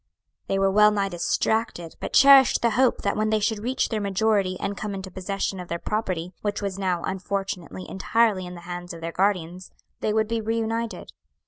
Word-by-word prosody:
"They 195 - 0
were 195 0 +2
well 210 +1 +6
nigh 200 -2 0
distracted, 175 0 -1
but - - -5
cherished 275 -2 +7
the 235 - +3
hope 255 +3 +2
that - - 0
when 215 0 0
they 215 0 +2
should 215 0 0
reach 250 +5 -1
their 220 -3 -2
majority 200 -2 +1
and 200 - -3
come 205 -1 -4
into 190 -1 -7
possession 195 +1 -3
of 180 - -7
their 170 - -3
property, 185 -3 -3
which 205 -1 -2
was 195 -1 -4
now 180 -3 -1
unfortunately 190 -1 -4
entirely 200 -1 +1
in 180 - -8
the 175 - -10
hands 175 0 -7
of 165 - -11
their 165 0 -4
guardians, 185 -1 -1 0.3
they 215 - 0
would 220 0 +1
be 230 0 -1
reunited. 225 +1 -2
200 Hz, 200 wpm, -25 LUFS, 185-220 Hz, 0.3 s, cherished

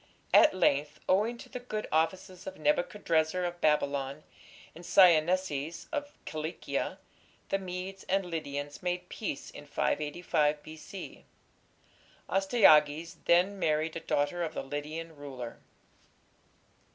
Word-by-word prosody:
At - - +7
length, 145 +1 +2
owing 215 +6 +2
to - - -11
the 250 - -6
good 215 -4 -4
offices 185 +4 -1
of 190 - -6
Nebuchadrezzar 165 +2 +1
of 175 0 -5
Babylon 140 -1 +1 0.5
and 170 - -12
Syennesis 170 -3 +3
of 290 -2 -3 0.2
Cilicia, 155 +2 -3 0.5
the 195 - +1
Medes 185 +1 -6
and 195 0 +2
Lydians 145 -4 -4
made 180 0 -2
peace 205 -11 -5
in 145 - -11
585 150 0 0
B.C. 160 +5 -9 1.0
Astyages 165 -6 +4
then 185 +4 +4
married 155 -1 +1
a - - -2
daughter 155 +2 0
of 160 -2 -3
the - - -3
Lydian 155 +4 -5
ruler. 135 -5 -8
165 Hz, 115 wpm, -30 LUFS, 150-185 Hz, 1.0 s, At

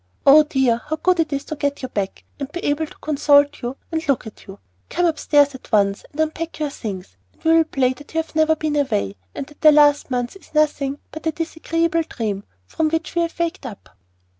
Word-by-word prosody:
Oh, 285 +3 +9
dear! 265 -6 +1
how 315 - -1
good 360 +2 +1
it 320 -2 +1
is 280 0 -2
to 310 - -5
get 285 -1 -2
you - - -2
back, 200 -5 -4 0.2
and 275 0 -5
be 350 - -6
able 295 +2 0
to - - -16
consult 290 -1 +3
you 245 +3 -4
and 320 0 -2
look 275 -3 +1
at 220 - -12
you! 195 0 -10 0.3
Come 355 - +1
upstairs 290 -3 +3
at 260 - -13
once, 200 -2 +2
and 295 - -12
unpack 320 +1 -2
your 300 -2 -2
things, 190 - -7 0.2
and - - -30
we 320 - +3
will 330 0 +6
play 260 -4 +1
that 290 +3 -15
you - - +3
have - - -21
never 315 0 +4
been 310 -1 -2
away, 100 - 0 0.2
and - - -4
that 295 +1 -19
the 310 - +8
last 290 -1 +4
month 245 +2 -2
is 390 - -18
nothing 290 -2 +1
but 315 +1 -6
a - - +2
disagreeable 330 +1 -1
dream 210 -10 -4 0.2
from 310 - -1
which 325 0 -2
we 345 - +1
have 335 0 -3
waked 340 +1 -2
up." 210 -5 -11
295 Hz, 230 wpm, -21 LUFS, 260-320 Hz, 0.3 s, Oh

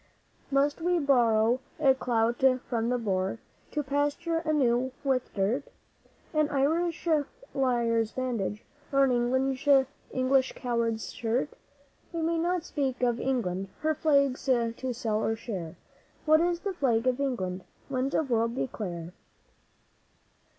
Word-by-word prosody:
Must 285 +3 +1
we 355 +1 +2
borrow 240 -5 +3 0.2
a 275 -3 +5
clout 240 -1 0 0.2
from 230 -1 -1
the 250 - +1
Boer 195 -3 -1 0.3
to 295 - -2
plaster 290 +4 0
anew 260 -6 +1
with 265 -3 0
dirt? 215 +8 0 0.7
An 305 -1 +2
Irish 320 +5 0 0.5
liar's 235 -4 +1
bandage, 235 -5 -2 0.3
or 275 0 +4
an 270 - +3 1.0
English 260 0 +2
coward's 235 -3 -2
shirt? 240 +5 -1 0.6
We 335 -1 -2
may 330 0 +1
not 350 0 0
speak 270 -6 -2
of 240 -1 +2
England; 195 -8 -1
her 315 0 +2
Flag's 280 -4 +2
to 240 0 0
sell 220 -2 -1
or 225 - +1
share. 190 -8 -6 0.5
What 310 +1 +5
is 345 0 0
the 395 -1 -2
Flag 245 -8 +1
of 255 0 +1
England? 190 -10 -2 0.2
Winds 265 0 -1
of 305 -4 0
the - - +1
World, 230 +1 +1
declare! 180 -10 -4
255 Hz, 130 wpm, -28 LUFS, 230-285 Hz, 1.0 s, a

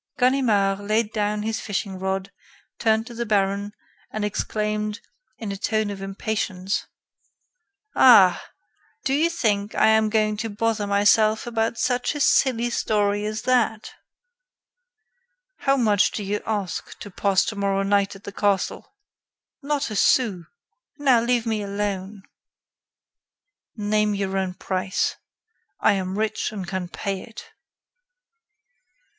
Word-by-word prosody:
Ganimard 230 -7 +2
laid 215 +2 0
down 210 -1 -1
his 220 0 -2
fishing 195 -2 -4
rod, 190 +1 -2 0.5
turned 220 0 +2
to 240 - -10
the 235 +1 -3
baron, 200 -1 0 0.4
and 215 -1 -3
exclaimed, 210 +1 -2 0.4
in 215 -3 -5
a 195 - -4
tone 215 +1 -1
of 195 -1 -7
impatience: 195 -1 -3 1.1
"Ah! 195 -8 +6 0.6
Do 270 - +1
you 315 +4 +3
think 210 -10 -1
I - - +4
am 220 0 +4
going 215 -1 +1
to 225 +1 -3
bother 215 0 -1
myself 215 +2 +3
about 230 -1 -1
such 250 +4 0
a - - -3
silly 240 -4 +3
story 205 -2 0
as 215 +1 -4
that!" 235 -4 +1 1.6
"How 275 -1 +1
much 210 -5 +3
do 210 - -5
you 205 +1 -2
ask 200 -6 -3
to 205 - -9
pass 195 0 +2
tomorrow 200 -2 -1
night 200 0 +1
in 195 - -14
the - - -7
castle?" 200 - -1 0.7
"Not 285 -4 -1
a - - -4
sou. 200 -6 +2 0.5
Now, 265 -5 +4
leave 240 0 +1
me 220 -2 -1
alone." 200 -1 -4 1.5
"Name 210 -1 +1
your 195 -1 -2
own 190 -1 -1
price. 190 0 -2 0.6
I 220 - +4
am 190 0 -3
rich 220 0 -1
and 195 -4 -6
can 185 -1 -3
pay 195 +2 -4
it." 230 -2 -12
210 Hz, 130 wpm, -23 LUFS, 200-225 Hz, 1.6 s, Ah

